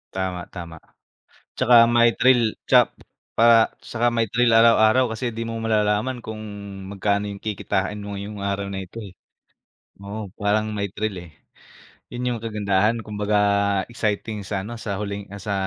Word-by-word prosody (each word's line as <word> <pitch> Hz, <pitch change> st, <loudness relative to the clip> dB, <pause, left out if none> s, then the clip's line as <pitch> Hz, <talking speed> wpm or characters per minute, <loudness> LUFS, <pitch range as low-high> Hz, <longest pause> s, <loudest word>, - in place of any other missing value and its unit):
Tama, 95 Hz, -1 st, -2 dB
tama. 85 Hz, -3 st, -8 dB, 0.8 s
Tsaka 125 Hz, -, +4 dB, 0.2 s
may 120 Hz, 0 st, +6 dB
thrill 130 Hz, -1 st, +5 dB, 0.3 s
tsak -, -, +7 dB, 0.5 s
pa 115 Hz, -, +3 dB, 0.5 s
tsaka 120 Hz, 0 st, +1 dB
may 115 Hz, -1 st, +2 dB
thrill 120 Hz, -1 st, +3 dB
araw-araw 115 Hz, +2 st, +5 dB
kasi 110 Hz, +3 st, -4 dB
di -, -, -2 dB
mo 115 Hz, -, -4 dB
malalaman 110 Hz, +3 st, +1 dB
kung 110 Hz, -1 st, -6 dB, 0.5 s
magkano 100 Hz, +1 st, 0 dB
yung 100 Hz, -1 st, -8 dB
kikitain 105 Hz, -1 st, -2 dB
mo -, -, -8 dB
ngayong 100 Hz, +1 st, -6 dB
araw 100 Hz, 0 st, -2 dB
na 95 Hz, -1 st, -4 dB
ito 95 Hz, -, -14 dB
eh. -, -, -12 dB, 0.9 s
Oo, 100 Hz, -1 st, -7 dB
parang 105 Hz, +1 st, +2 dB
may 100 Hz, 0 st, -1 dB
thrill 105 Hz, -1 st, -2 dB
eh. -, -, -21 dB, 0.8 s
Yun 125 Hz, +1 st, -4 dB
yung -, -, -4 dB
kagandahan 105 Hz, +1 st, 0 dB
kumbaga 105 Hz, 0 st, -1 dB, 0.6 s
exciting 110 Hz, -1 st, -2 dB
sa 95 Hz, -2 st, -2 dB
ano, 115 Hz, +2 st, -7 dB
sa 100 Hz, -4 st, -3 dB
huling 100 Hz, 0 st, -5 dB
ah, -, -, -7 dB
sa, 105 Hz, -, -1 dB
105 Hz, 155 wpm, -23 LUFS, 100-115 Hz, 0.9 s, tsak